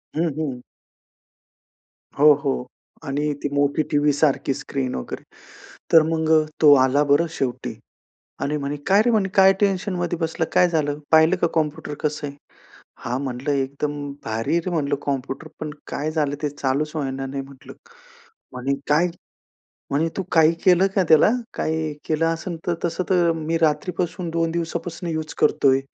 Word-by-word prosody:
हं, 165 Hz, +1 st, +1 dB
हं. 135 Hz, -6 st, -3 dB, 1.6 s
हो, 150 Hz, 0 st, +8 dB
हो. 135 Hz, -3 st, -2 dB, 0.4 s
आणि 145 Hz, +2 st, -1 dB
ती 145 Hz, -, -2 dB
मोठी 145 Hz, +2 st, +2 dB
टीव्हीसारखी 145 Hz, -1 st, +2 dB
स्क्रीन 130 Hz, -1 st, -4 dB
वगैरे, 60 Hz, -, -6 dB, 0.7 s
तर 165 Hz, -, +8 dB
मग 160 Hz, 0 st, -1 dB
अ, 155 Hz, -1 st, +5 dB
तो 150 Hz, -2 st, +8 dB
आला 140 Hz, +3 st, +3 dB
बरं 165 Hz, +4 st, +4 dB
शेवटी 130 Hz, -6 st, -3 dB, 0.7 s
आणि 150 Hz, +1 st, -1 dB
म्हणे, 145 Hz, +1 st, -3 dB
"काय 200 Hz, +2 st, +5 dB
रे 240 Hz, +1 st, +2 dB
म्हणे, 200 Hz, -4 st, +1 dB
काय 195 Hz, 0 st, +7 dB
टेन्शनमध्ये 185 Hz, -3 st, 0 dB
बसलं, 160 Hz, 0 st, -1 dB
काय 180 Hz, -, +5 dB
झालं? 150 Hz, -3 st, 0 dB
पाहिलं 160 Hz, +3 st, +6 dB
का 170 Hz, -, +4 dB
कॉम्प्युटर 155 Hz, -1 st, -2 dB
कसं 150 Hz, -1 st, -2 dB
आहे?" 140 Hz, -, -9 dB, 0.7 s
हां 125 Hz, +3 st, -1 dB
म्हटलं, 130 Hz, +2 st, -3 dB
एकदम 145 Hz, +1 st, -4 dB
भारी 110 Hz, +1 st, -2 dB
आहे -, -, +3 dB
रे 185 Hz, -, -2 dB
म्हटलं 145 Hz, -3 st, 0 dB
कॉम्प्युटर, 135 Hz, +2 st, -3 dB
पण 155 Hz, -1 st, -4 dB, 0.2 s
काय 150 Hz, +2 st, -3 dB
झालं, 150 Hz, -3 st, 0 dB
ते 145 Hz, -, +1 dB
चालूच 145 Hz, +2 st, -1 dB
होईना 135 Hz, -2 st, -3 dB
नाही 135 Hz, +1 st, -4 dB
म्हटलं. 135 Hz, -1 st, -13 dB, 0.8 s
म्हणे, 130 Hz, +2 st, -2 dB, 0.2 s
काय? 160 Hz, +4 st, +4 dB, 0.8 s
म्हणे 155 Hz, +4 st, +1 dB
"तू 195 Hz, -, -1 dB
काही 160 Hz, 0 st, +5 dB
केलं 185 Hz, +1 st, +5 dB
का 190 Hz, -, +5 dB
त्याला? 160 Hz, +6 st, +6 dB, 0.2 s
काय 160 Hz, -, -1 dB, 0.3 s
केलं 160 Hz, +1 st, +1 dB
असेल 165 Hz, +1 st, -2 dB
तर. 175 Hz, -, +1 dB
तसं 175 Hz, +2 st, -1 dB
तर 175 Hz, -2 st, +3 dB
मी 160 Hz, +1 st, -1 dB
रात्रीपासून 165 Hz, +2 st, -1 dB
2 165 Hz, 0 st, 0 dB
दिवसापासून 170 Hz, +1 st, -4 dB
युज 155 Hz, -1 st, -4 dB
करतोय 135 Hz, -3 st, +3 dB
155 Hz, 155 wpm, -22 LUFS, 140-165 Hz, 1.6 s, हो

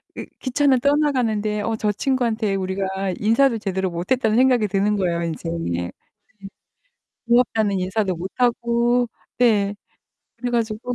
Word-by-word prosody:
이 -, -, -6 dB
기차는 265 Hz, 0 st, +2 dB
떠나가는데 245 Hz, -7 st, +1 dB
어 225 Hz, +2 st, -1 dB
저 215 Hz, -1 st, 0 dB
친구한테 225 Hz, -3 st, 0 dB
우리가 190 Hz, 0 st, -2 dB
인사도 230 Hz, +3 st, +3 dB
제대로 190 Hz, -3 st, -2 dB
못 170 Hz, +1 st, -6 dB
했다는 230 Hz, -3 st, +2 dB
생각이 250 Hz, -4 st, +4 dB
드는 200 Hz, +2 st, +1 dB
거예요, 175 Hz, -4 st, 0 dB
인제. 165 Hz, 0 st, -4 dB, 0.2 s
네 85 Hz, +1 st, -3 dB, 1.4 s
고맙다는 225 Hz, -4 st, +2 dB
인사도 190 Hz, +1 st, -1 dB
못 180 Hz, +3 st, -6 dB
하고, 240 Hz, 0 st, +2 dB, 0.3 s
네. 210 Hz, -4 st, +2 dB, 0.6 s
그래 245 Hz, +1 st, -3 dB
가지고 235 Hz, +1 st, -2 dB
220 Hz, 300 characters per minute, -22 LUFS, 195-245 Hz, 1.4 s, 생각이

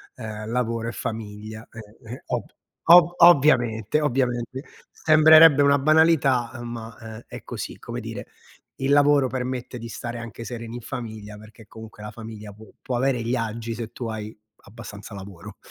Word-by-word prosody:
ehm, 110 Hz, -2 st, -7 dB
lavoro 115 Hz, -1 st, -1 dB
e -, -, -4 dB
famiglia, 110 Hz, -1 st, -7 dB
eh, 115 Hz, -, -11 dB, 0.3 s
eh, 125 Hz, -, -10 dB
ob -, -, -2 dB, 0.4 s
ov 175 Hz, 0 st, +7 dB
ovviamente, 135 Hz, -, +4 dB
ovviamente. 130 Hz, -2 st, -1 dB, 0.3 s
Sembrerebbe 155 Hz, -1 st, +6 dB
una 140 Hz, 0 st, +4 dB
banalità, 135 Hz, -5 st, +3 dB
ma, 115 Hz, -1 st, -8 dB
ehm, 110 Hz, 0 st, -10 dB
è -, -, -10 dB
così, -, -, -7 dB
come -, -, -6 dB
dire: -, -, -7 dB, 0.5 s
il 135 Hz, +1 st, -1 dB
lavoro 145 Hz, -1 st, +4 dB
permette 125 Hz, -1 st, -4 dB
di 115 Hz, 0 st, -8 dB
stare 120 Hz, +2 st, -6 dB
anche 115 Hz, 0 st, -8 dB
sereni 115 Hz, -1 st, -7 dB
in 120 Hz, -, -7 dB
famiglia, 110 Hz, -3 st, -7 dB
perché, 110 Hz, +1 st, -16 dB
comunque, 110 Hz, -1 st, -12 dB
la 105 Hz, -, -7 dB
famiglia 110 Hz, -1 st, -10 dB
può 110 Hz, +2 st, -15 dB
può 125 Hz, -, -3 dB
avere 130 Hz, -1 st, 0 dB
gli 115 Hz, +2 st, -1 dB
agi 115 Hz, -1 st, -4 dB
se 115 Hz, -1 st, -6 dB
tu 120 Hz, -, -5 dB
hai 110 Hz, -1 st, -6 dB, 0.3 s
abbastanza 105 Hz, -1 st, -11 dB
lavoro 95 Hz, -3 st, -10 dB
115 Hz, 160 wpm, -24 LUFS, 110-130 Hz, 0.5 s, ov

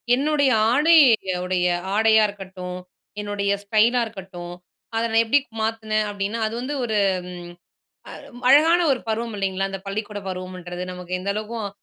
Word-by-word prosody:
என்னுடைய 285 Hz, 0 st, +2 dB, 0.2 s
ஆடைய 275 Hz, -, +5 dB
உடைய 180 Hz, -1 st, +1 dB, 0.3 s
ஆடையா 220 Hz, 0 st, +5 dB
இருக்கட்டும். 185 Hz, -2 st, -8 dB, 0.4 s
என்னுடைய 205 Hz, -1 st, -2 dB
ஸ்டைலா 225 Hz, +4 st, +3 dB
இருக்கட்டும். 185 Hz, -5 st, -9 dB, 0.4 s
அத 225 Hz, -, +1 dB
நான் 225 Hz, +1 st, +4 dB
எப்பிடி 285 Hz, +6 st, +4 dB, 0.2 s
மாத்துனேன் 220 Hz, -1 st, -1 dB
அப்பிடின்னா, 205 Hz, +3 st, -3 dB
அது 220 Hz, -, -6 dB
வந்து 280 Hz, +4 st, -4 dB
ஒரு 220 Hz, -2 st, -1 dB, 1.1 s
அ -, -, -9 dB, 0.4 s
அழகான 320 Hz, +5 st, +6 dB
ஒரு 250 Hz, -, -2 dB
பருவம் 225 Hz, 0 st, -2 dB
இல்லைங்களா! 195 Hz, -1 st, -1 dB
அந்த 195 Hz, -, -5 dB
பள்ளிக்கூடப் 205 Hz, 0 st, -5 dB
பருவம்ன்றது 180 Hz, -1 st, -6 dB
நமக்கு 180 Hz, 0 st, -9 dB
எந்த 200 Hz, -, -2 dB
அளவுக்கும் 215 Hz, 0 st, -4 dB
215 Hz, 135 wpm, -23 LUFS, 190-230 Hz, 1.1 s, அழகான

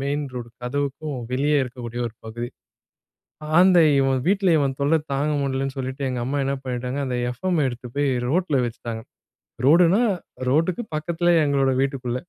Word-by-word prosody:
Main 145 Hz, +2 st, -1 dB
road 120 Hz, -2 st, -6 dB
கதவுக்கும் 140 Hz, +2 st, -3 dB, 0.2 s
வெளியே 145 Hz, +3 st, +2 dB
இருக்கக்கூடிய 120 Hz, -1 st, -6 dB
ஒரு 115 Hz, -, -8 dB
பகுதி. 120 Hz, +2 st, -5 dB, 1.1 s
அந்த 185 Hz, -1 st, +6 dB, 0.2 s
இவன் 135 Hz, -1 st, +2 dB
வீட்ல 195 Hz, -1 st, +3 dB
இவன் 135 Hz, -2 st, 0 dB
தொல்ல 145 Hz, +3 st, +3 dB, 0.2 s
தாங்க 150 Hz, +2 st, 0 dB
முடியலனு 135 Hz, 0 st, -2 dB
சொல்லிட்டு 130 Hz, +1 st, -4 dB
எங்க 125 Hz, -1 st, -2 dB
அம்மா 140 Hz, +3 st, -1 dB
என்ன 135 Hz, +1 st, 0 dB
பண்ணிட்டாங்க, 125 Hz, +1 st, -3 dB
அந்த 125 Hz, -1 st, -2 dB
எஃப்எம் 170 Hz, +6 st, -1 dB
எடுத்து 125 Hz, 0 st, -5 dB
போய் 145 Hz, -1 st, +2 dB, 0.2 s
ரோட்ல 165 Hz, -4 st, +1 dB
வைச்சிட்டாங்க. 115 Hz, -1 st, -5 dB, 0.6 s
ரோடுனா 175 Hz, +6 st, +5 dB, 0.5 s
ரோட்டுக்கு 165 Hz, -, +1 dB
பக்கத்திலேயே 170 Hz, +1 st, +2 dB
எங்களோட 135 Hz, -2 st, +2 dB
வீட்டுக்குள்ள. 130 Hz, -3 st, -2 dB
140 Hz, 145 wpm, -23 LUFS, 125-155 Hz, 1.1 s, அந்த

